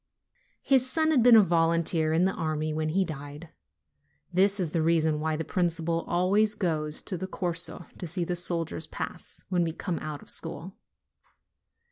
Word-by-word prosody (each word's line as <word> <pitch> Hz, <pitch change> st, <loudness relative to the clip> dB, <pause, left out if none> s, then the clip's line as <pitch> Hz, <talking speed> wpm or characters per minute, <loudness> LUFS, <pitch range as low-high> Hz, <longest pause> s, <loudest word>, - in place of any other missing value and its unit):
His 260 Hz, -2 st, +3 dB
son 315 Hz, +3 st, +1 dB
had 275 Hz, -6 st, +4 dB
been 240 Hz, 0 st, +7 dB
a 220 Hz, -, +8 dB
volunteer 165 Hz, -2 st, +1 dB
in 165 Hz, +3 st, +3 dB
the 190 Hz, -, +1 dB
army 155 Hz, -1 st, -2 dB
when 155 Hz, 0 st, -2 dB
he 190 Hz, +4 st, +1 dB
died: 150 Hz, 0 st, -8 dB, 0.8 s
this 195 Hz, +3 st, +3 dB
is 170 Hz, -5 st, 0 dB
the 165 Hz, -, 0 dB
reason 160 Hz, -1 st, +2 dB
why 155 Hz, 0 st, -1 dB
the 160 Hz, +1 st, -4 dB
principal 170 Hz, -2 st, -1 dB
always 200 Hz, +5 st, +2 dB
goes 155 Hz, -6 st, -2 dB
to 185 Hz, -, -4 dB
the 190 Hz, -, -4 dB
Corso 175 Hz, -1 st, +1 dB
to 175 Hz, -, -5 dB
see 175 Hz, +2 st, -2 dB
the 175 Hz, +1 st, -2 dB
soldiers 170 Hz, -2 st, -2 dB
pass, -, -, -5 dB
when 180 Hz, -2 st, +1 dB
we 165 Hz, -1 st, -2 dB
come 175 Hz, 0 st, -4 dB
out 155 Hz, -2 st, -6 dB
of -, -, -8 dB
school. 175 Hz, +3 st, -5 dB
170 Hz, 175 wpm, -27 LUFS, 160-185 Hz, 0.8 s, a